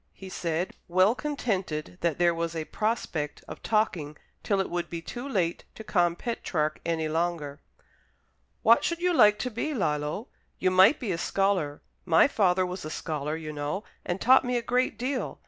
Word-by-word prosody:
he 190 - -10
said, 170 0 -2
well 185 +4 +4
contented 195 - -3
that 170 -3 0
there 175 -1 +3
was 165 0 -3
a 160 -1 -3
prospect 175 -10 -2
of - - -9
talking 175 -9 0 0.2
till 200 -2 0
it 190 - 0
would 175 0 -3
be 170 - -4
too 245 +11 -7
late 175 -8 0
to 220 - -8
con 175 -5 +2
Petrarch 175 -8 -2
any 165 -2 -1
longer. 155 -3 -2 1.0
"What 230 +1 +6
should 340 - 0
you 360 +1 +1
like 210 -9 +6
to 250 - -3
be, 290 +7 -2
Lillo? 150 - -1 0.3
You 185 - +1
might 190 +9 +6
be 230 -7 -2
a 170 - -2
scholar. 185 -8 0 0.2
My 165 +4 +5
father 185 -7 +2
was 180 +1 -5
a 155 - -5
scholar, 150 -1 -3
you 155 -1 -6
know, 150 +7 -3 0.2
and 175 +1 -3
taught 260 +5 +6
me 250 -1 0
a 235 - -2
great 250 -1 +1
deal. 255 +3 -3
180 Hz, 180 wpm, -27 LUFS, 160-220 Hz, 1.0 s, What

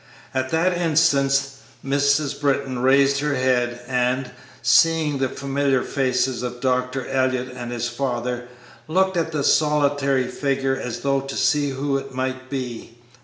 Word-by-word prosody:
At 130 0 -1
that 175 +4 +1
instant 155 -5 +2 0.5
Mrs. 140 +1 +1
Britton 135 -3 0
raised 135 +2 +4
her 145 0 0
head, 120 -2 0
and, 125 0 0 0.3
seeing 160 -4 +3
the 135 -1 0
familiar 140 -1 0
faces 130 -2 0
of 125 0 -5
Dr. 125 0 -1
Elliott 130 -1 0
and 120 -1 -6
his 120 0 -2
father, 125 -1 -3 0.4
looked 190 +3 +1
at 165 -1 0
the 150 -3 -1
solitary 145 -3 +2
figure 135 0 -1
as 125 -3 -5
though 140 -1 +1
to 135 0 -7
see 145 -1 +2
who 135 +1 -1
it 135 -1 -10
might 130 0 -3
be. 125 -3 -6
135 Hz, 145 wpm, -22 LUFS, 125-140 Hz, 0.5 s, raised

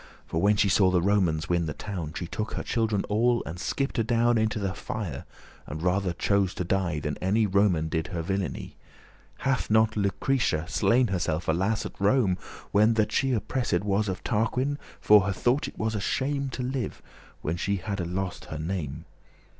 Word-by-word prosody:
For, 80 - -2
when 105 +2 +4
she 100 - +3
saw 95 0 +4
the 90 -1 +3
Romans 90 -4 +1
win 85 -2 +1
the 75 - -4
town, 85 -7 -5
She 90 - -3
took 105 +5 -4
her - - -3
children 110 -4 0
all, 120 +3 +2
and 85 +2 -6
skipt 135 +6 -1
adown 120 +1 +3
Into 110 -1 +1
the 100 -2 -2
fire, 100 -10 -5 0.4
and 80 +4 -6
rather 90 +1 +1
chose 95 +2 +1
to - - -2
die, 85 -4 0
Than 75 -1 -3
any 105 +4 +2
Roman 95 -5 +2
did 80 0 -2
her 85 -3 -4
villainy. 90 -9 -3 0.7
Hath 135 -1 +1
not 110 0 +4
Lucretia 100 -3 0
slain 120 +3 +3
herself, 85 -3 -1
alas! 95 +7 +1
At - - -8
Rome, 100 -3 +3 0.3
when 105 +3 +4
that 110 -1 +1
she 135 +3 +1
oppressed* 115 -4 0
was 105 +1 +1
*ravished - - -1
Of 95 - -4
Tarquin? 125 +6 0 0.2
for 105 -1 +7
her 100 +1 -1
thought 125 +8 +1
it - - -10
was 110 0 -1
a 105 - -2
shame 140 +5 -1
To 125 0 -4
live, 125 -3 -3 0.4
when 80 - -1
she 100 +3 -1
hadde 100 -2 -3
lost 90 +1 -3
her 80 - -6
name. 80 -3 -4
100 Hz, 190 wpm, -27 LUFS, 90-110 Hz, 0.7 s, for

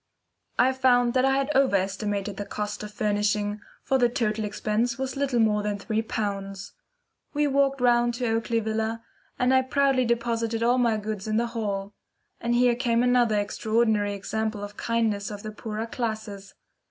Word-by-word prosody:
I 260 +1 +4
found 245 -2 +3
that 255 0 +3
I 270 0 +3
had 275 +2 0
over 270 -6 +3
estimated 200 +1 -2
the 205 - -4
cost 210 0 -4
of 210 0 -7
furnishing, 210 0 0 0.2
for 270 -1 +1
the 240 -1 +4
total 220 -3 -1
expense 215 +4 -1
was 265 0 -3
little 275 -3 0
more 215 -2 +3
than 205 0 -2
three 215 +2 -1
pounds. 195 -3 -4 0.6
We 295 0 +2
walked 275 -1 +2
round 240 -1 +3
to 245 +1 -2
Oakley 230 +1 0
Villa, 220 +1 -2 0.3
and 250 +1 +2
I 260 - +5
proudly 265 0 +2
deposited 230 -1 0
all 245 +2 +3
my 230 -3 +2
goods 215 -1 -5
in 215 0 0
the 235 - +2
hall. 200 -3 -3 0.5
And 235 0 0
here 245 0 +4
came 235 -1 +1
another 245 -4 +3
extraordinary 215 0 +1
example 215 +1 -3
of 205 - -6
the 205 - -26
kindness 220 -4 0
of 205 -1 -7
the 215 - -5
poorer 215 +1 -5
classes. 220 -4 -5
225 Hz, 175 wpm, -26 LUFS, 210-245 Hz, 0.6 s, I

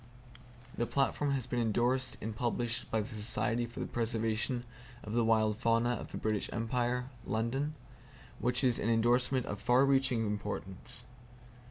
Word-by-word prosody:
The 120 - +1
platform 140 +3 +1
has 130 -4 -1
been 125 -1 -2
endorsed 120 +3 +1
and 110 0 -4
published 120 0 -1
by 110 -1 +1
The 105 - -5
Society 115 +2 +2
for 115 - -9
the - - -1
Preservation 115 +1 -1 0.4
of 105 - -6
the 120 0 +3
Wild 110 -1 +3
Fauna 115 +1 +2
of 120 - -4
the - - -4
British 110 -2 -1
Empire 125 +2 -1
(London), 130 +8 -1 0.6
which 125 +2 0
is 125 -3 +3
an 115 - 0
endorsement 120 +3 +2
of 100 0 -5
far 125 +4 +5
reaching 135 -4 +2
importance. 105 +1 -3
120 Hz, 155 wpm, -32 LUFS, 110-125 Hz, 0.6 s, far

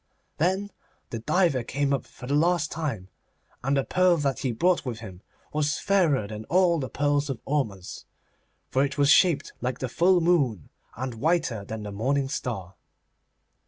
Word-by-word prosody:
Then 190 +5 0 0.4
the 115 - -3
diver 165 +1 +2
came 140 +4 -1
up 135 - -1
for - - -12
the 135 - -2
last 160 +1 +2
time, 125 - -4 0.5
and 135 +2 +1
the 135 - +2
pearl 185 +2 +3
that 140 -5 -1
he 130 - -1
brought 175 +10 +2
with 125 -5 -4
him 95 -5 -10 0.3
was 150 -1 0
fairer 170 - +2
than 105 +1 -7
all 175 -2 +3
the 130 - -4
pearls 145 0 0
of 130 -5 -3
Ormuz, 110 -11 -3 0.7
for 135 - +3
it 140 +1 -2
was 145 0 +4
shaped 175 -3 +4
like 125 0 -2
the 130 - -3
full 175 +8 +3
moon, 145 - +1 0.3
and 130 +1 -4
whiter 130 - 0
than 110 +1 -6
the 105 - -6
morning 135 +6 0
star. 100 -10 -4
140 Hz, 170 wpm, -26 LUFS, 115-165 Hz, 0.7 s, was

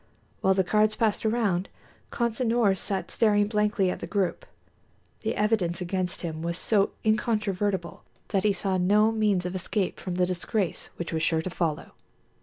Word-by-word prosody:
While 190 0 +3
the 190 - +3
cards 215 +3 +2
passed 220 0 +1
around, 205 -5 0 0.4
Consinor 235 -3 +1
sat 195 +1 -3
staring 205 -2 +3
blankly 210 -3 +1
at - - -5
the - - -6
group. 190 -4 -1 0.7
The - - -2
evidence 205 -5 +1
against 185 0 -2
him 160 -2 -4
was 170 +1 -2
so 205 -1 +2
incontrovertible 205 -4 0 0.3
that 195 -3 +1
he 210 - +3
saw 190 0 0
no 210 +4 +4
means 210 -5 +1
of 180 - -3
escape 185 +1 -2
from 180 -2 -4
the 180 0 +3
disgrace 185 +2 -2
which 170 -1 -5
was 160 - 0
sure 160 0 +1
to 185 - -4
follow. 165 -3 -2
195 Hz, 165 wpm, -27 LUFS, 180-215 Hz, 0.7 s, no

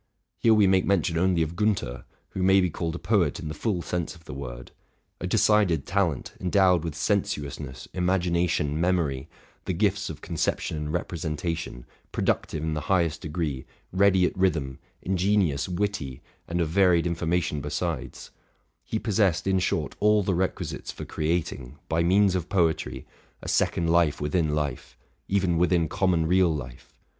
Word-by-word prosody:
Here 115 -1 +5
we 105 -2 +5
make 95 -1 +4
mention 90 -3 +1
only 90 -2 +2
of 80 +2 -5
Giinther, 85 - -1 0.2
who 95 - -5
may 95 +1 +5
be 90 -2 +1
called 80 +1 -3
a - - -3
poet 100 -1 +1
in 80 -5 -5
the - - -4
full 90 +1 -2
sense 90 -2 -3
of 80 -1 -18
the - - -8
word. - - -7 0.5
A 90 - -3
decided 100 -6 +3
talent, 90 -9 -1
endowed 90 -2 +3
with 80 -3 -4
sensuousness, 70 -2 -2
imagination, 85 -4 +1
memory, 80 -6 0 0.4
the - - -1
gifts - - 0
of - - -8
conception - - -2
and 75 -1 -4
represen 75 0 -3
tation, 80 -7 -4 0.3
productive 75 - -1
in 80 0 -1
the 75 - -2
highest 85 -4 +2
degree, 75 -4 -3 0.3
ready 95 -1 +4
at - - -1
rhythm, 80 -9 0 0.2
ingenious, 95 -5 +1
witty, 85 -8 -3 0.2
and 85 +1 -2
of 80 - 0
varied 90 -1 +4
information 85 -3 -1
besides, 75 0 -4 0.3
— - - -45
he 110 - -3
possessed, 100 -7 +1
in 95 -1 +2
short, 90 - -1
all 105 0 +4
the 95 - 0
requisites 90 +2 -2
for - - -8
creating, 75 -5 -2
by 80 0 +1
means 95 +3 +4
of 90 -2 -2
poetry, 85 -5 0 0.4
a - - -7
second 85 - +1
life 85 -3 +3
within 75 +1 0
life, 70 -3 -4 0.3
even 95 -4 +1
within 85 -2 +3
common 85 -1 +1
real 90 +1 +4
life. 65 -5 -7
85 Hz, 165 wpm, -26 LUFS, 75-95 Hz, 0.5 s, Here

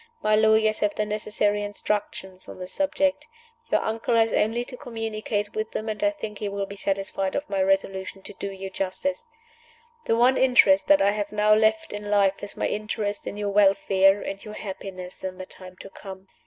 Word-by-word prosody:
My 215 0 +4
lawyers 220 0 +3
have 205 -1 0
the 210 - 0
necessary 210 0 0
instructions 205 -2 -4
on - - -9
this 185 0 -7
subject. 290 +1 0 0.4
Your - - +3
uncle 225 +2 -1
has 225 0 +3
only 230 +3 +1
to 250 - -9
communicate 220 -3 -3
with 215 0 -2
them, 215 - -3
and 215 -1 -3
I 310 - +5
think 220 -10 -7
he 210 - -2
will 200 0 -3
be 200 - -9
satisfied 195 -1 -2
of 285 - -2
my 195 -1 -1
resolution 195 0 -1
to - - -8
do 200 - -5
you 195 0 -7
justice. 275 - -3 0.8
The 225 - +2
one 250 +2 +4
interest 205 -7 +5
that 295 -7 +5
I 200 - +4
have 205 0 -3
now 210 0 +4
left 220 0 +2
in 205 0 -6
life 200 -2 +2
is 205 - -8
my - - -1
interest 210 -1 -3
in 205 - -5
your 205 -1 -2
welfare 195 -1 +4
and 195 0 -6
your 210 0 -8
happiness 190 -3 -7
in 185 -1 -4
the 185 - -7
time 185 0 -13
to - - -10
come. 190 -1 -10
205 Hz, 200 wpm, -25 LUFS, 195-220 Hz, 0.8 s, I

